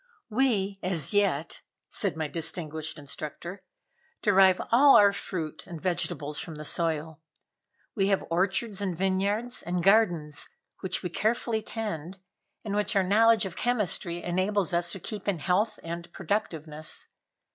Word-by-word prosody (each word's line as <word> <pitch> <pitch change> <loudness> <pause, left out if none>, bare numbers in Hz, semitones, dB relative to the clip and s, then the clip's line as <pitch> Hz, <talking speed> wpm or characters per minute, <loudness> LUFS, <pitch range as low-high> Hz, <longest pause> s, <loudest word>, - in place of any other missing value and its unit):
"We, 210 -5 +1
as 180 -2 +2
yet," 185 -7 +1 0.3
said 155 - -2
my 155 -1 -1
distinguished 160 -1 -2
instructor, 155 +6 -7 0.6
"derive 190 -2 +5
all 275 +4 +7
our 200 -1 +7
fruit 155 -7 -5
and 170 -2 -7
vegetables 155 -4 -1
from 165 - -6
the 150 - -7
soil. 160 0 -1 0.7
We 195 -3 +1
have 195 -1 +1
orchards 195 +4 0
and 185 -4 -2
vineyards 200 +6 0
and 175 0 -2
gardens 175 -7 +3 0.3
which 190 - -1
we 180 - -3
carefully 220 +3 0
tend, 195 -6 -5 0.5
and 205 - -3
which 210 -1 0
our 195 - +4
knowledge 220 +3 +4
of 185 -2 -6
chemistry 195 -7 -1
enables 185 +1 0
us 170 0 +1
to 195 - -5
keep 205 +3 -7
in 200 -3 +1
health 195 +8 0
and 170 +1 -6
productiveness. 160 -5 -3
185 Hz, 140 wpm, -28 LUFS, 165-205 Hz, 0.7 s, all